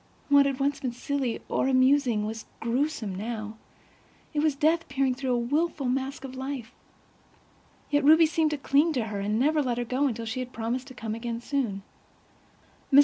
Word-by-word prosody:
What 280 0 +6
had 275 -1 -2
once 280 +1 0
been 255 -3 -3
silly 265 -1 -2
or - - 0
amusing 255 -4 +3
was 220 +1 -6
gruesome, 235 -3 -1
now; 215 +2 -5 0.8
it 300 - 0
was 305 -1 +2
death 320 +4 +1
peering 265 -1 +1
through 260 -1 -2
a - - +2
wilful 285 +3 0
mask 265 +2 -2
of 265 -1 -7
life. 260 -3 -5 1.2
Yet 290 0 +3
Ruby 320 +3 +7
seemed 320 0 +1
to 300 - -2
cling 285 +4 +2
to 235 -5 -1
her, 200 - -2
and 210 +2 0
never 300 +5 +3
let 245 -4 -1
her 245 - -1
go 260 +4 +1
until 230 -3 -3
she 225 +3 -3
had 255 0 -5
promised 240 +3 -3
to 260 - -11
come 220 -2 -4
again 230 +1 -4
soon. 235 -7 -2 1.1
Mrs. 275 - +8
260 Hz, 190 wpm, -27 LUFS, 235-285 Hz, 1.2 s, Mrs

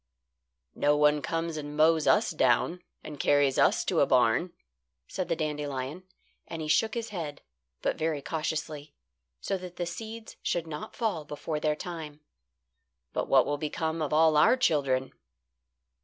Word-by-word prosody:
"No 145 0 +2
one 150 0 +4
comes 165 +1 -2
and 145 0 -6
mows 160 0 +4
us 210 -3 +4
down 155 +5 +2 0.2
and 150 -2 -8
carries 145 -2 +3
us - - +3
to - - +1
a - - +4
barn," - - +3 0.6
said 185 - -3
the 165 - 0
dandelion, 150 +1 -4 0.4
and 165 - -6
he 155 - -4
shook 220 +8 +2
his 230 -1 -3
head, 165 -8 -6 0.4
but - - -1
very 155 -2 0
cautiously, 155 -1 -4 0.5
so 195 - -2
that 180 -1 -9
the 175 - -3
seeds 220 +6 -8
should 170 -1 -1
not 155 -2 -7
fall 210 -10 -1
before 150 +1 -4
their 150 0 +1
time. 155 -3 -7 0.9
"But - - -1
what 135 -1 +5
will 145 0 -2
become 160 +2 -2
of 150 - -2
all 155 0 +4
our 245 +11 +5
children?" 140 - +1
155 Hz, 155 wpm, -28 LUFS, 150-170 Hz, 0.9 s, what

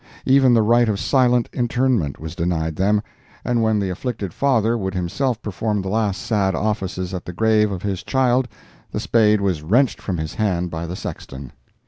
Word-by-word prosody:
Even 130 -2 +5
the 115 - +4
right 120 +1 +4
of 100 -2 -1
silent 125 -3 +2
interment 120 - 0
was 80 +1 -7
denied 85 -3 -1
them, 105 +4 +1 0.4
and 120 -1 +1
when 110 -1 +2
the 100 -2 -1
afflicted 100 -2 -4
father 120 -5 +2
would 95 -4 -3
himself 110 +7 -1
perform 105 0 -2
the 95 - -4
last 105 -2 -1
sad 100 -4 +1
offices 95 -4 -2
at 90 - -4
the - - -5
grave 110 +1 +2
of 95 -2 -5
his 100 -2 -2
child 130 -1 +1 0.4
the - - -4
spade 105 -2 +3
was 95 -6 0
wrenched 115 - +2
from 95 -3 -3
his 80 -1 -4
hand 90 -5 -1
by 80 +1 -4
the 90 - -5
sexton." 65 -7 -7
105 Hz, 185 wpm, -21 LUFS, 90-120 Hz, 0.4 s, Even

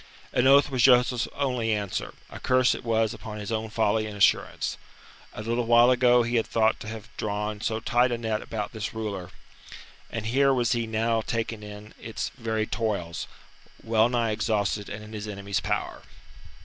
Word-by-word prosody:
An 125 +1 +3
oath 140 +1 +6
was 130 -2 0
Joseph's 125 -1 +4
only 125 -5 0
answer 105 -3 -2 0.2
a - - -8
curse 130 0 +3
it - - -7
was 115 -1 +1
upon 110 -2 -8
his 105 +1 -6
own 110 0 -2
folly 110 0 +1
and 105 -1 -7
assurance. 100 - +2 0.6
A 105 - -7
little 115 +1 -1
while 120 +1 +6
ago 125 -1 +4
he 120 +1 0
had 115 - 0
thought 110 -1 +2
to - - -8
have 110 0 -9
drawn 105 0 -3
so 110 0 -1
tight 120 +2 +2
a 120 - 0
net 110 -2 -2
about 105 -2 -4
this 110 -1 -5
ruler, 100 -5 -4 0.8
and 115 -2 -4
here 135 +4 +3
was 120 -2 +1
he 115 -1 0
now 115 +1 +1
taken 115 -1 -3
in 105 +1 -10
its 115 -2 -4
very 110 -3 -1
toils, 100 -8 -3 0.6
well 110 0 +3
nigh 120 -2 +1
exhausted 105 -1 -1
and 105 0 -7
in 105 +1 -11
his 105 0 -5
enemy's 100 -1 -3
power. - - -3
110 Hz, 185 wpm, -26 LUFS, 105-120 Hz, 0.8 s, oath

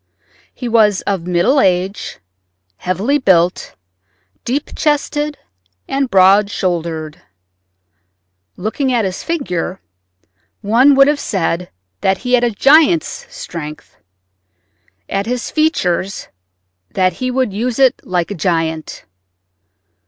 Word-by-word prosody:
He 245 - -6
was 215 -4 +3
of 190 -4 -3
middle 180 +11 +2
age, 185 +1 0 0.6
heavily 200 - 0
built, 180 -7 +1 0.7
deep 275 +4 -3
chested, 295 0 -1 0.5
and 270 -1 -1
broad 195 +1 +5
shouldered. 165 -5 -3 1.4
Looking 225 +8 -1
at 235 -4 +1
his 185 -1 -4
figure, 190 - -3 0.8
one 245 +7 +4
would 275 0 +6
have 295 0 +1
said 180 -5 -2 0.3
that 190 0 +1
he 250 +4 -4
had 245 -1 +4
a 240 - +3
giant's 315 - +3
strength; 155 -2 -8 1.1
at 195 +2 -2
his 245 0 -3
features, 195 - 0 0.6
that 185 -1 +1
he 255 - 0
would 255 -4 -1
use 235 +3 -2
it 265 -2 +3
like 180 0 -2
a - - -1
giant. 165 -3 -2
205 Hz, 110 wpm, -16 LUFS, 180-265 Hz, 1.4 s, would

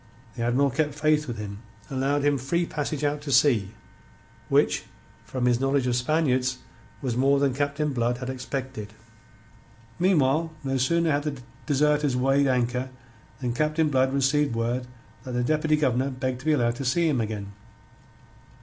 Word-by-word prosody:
The 120 - -5
Admiral 130 +4 +2
kept 150 +2 -1
faith 150 0 +2
with 120 -2 -4
him, 100 -1 -6 0.3
and 135 - -4
allowed 140 +2 +1
him 145 -2 +2
free 170 +7 0
passage 150 -2 -3
out 145 0 0
to 145 -1 -5
sea, 125 -7 +4 0.8
which, - - +2 0.4
from 130 -2 -2
his 120 -1 +3
knowledge 135 0 +1
of 125 -1 +1
Spaniards, 130 -1 +1 0.5
was 125 -3 -1
more 135 +2 +3
than 140 -2 +2
Captain 145 +2 -1
Blood 120 0 0
had 125 0 -6
expected. 130 -4 -5 1.1
Meanwhile, 160 -3 +2
no 135 -1 -1
sooner 165 +6 +2
had 145 0 +1
the 145 -3 -3 0.3
deserters 150 -1 +2
weighed 135 +2 +3
anchor 125 0 0 0.5
than 125 -2 -1
Captain 155 +3 +1
Blood 130 -1 +2
received 140 -1 +1
word 120 +2 -1 0.4
that 130 -1 -6
the 125 0 0
Deputy 155 +3 +2
Governor 135 -3 +1
begged 130 -1 -3
to 135 - -13
be 155 - +4
allowed 120 -4 +1
to 140 - -4
see 165 +7 +2
him 135 -6 +1
again. 105 -2 -4
135 Hz, 165 wpm, -26 LUFS, 125-150 Hz, 1.1 s, sea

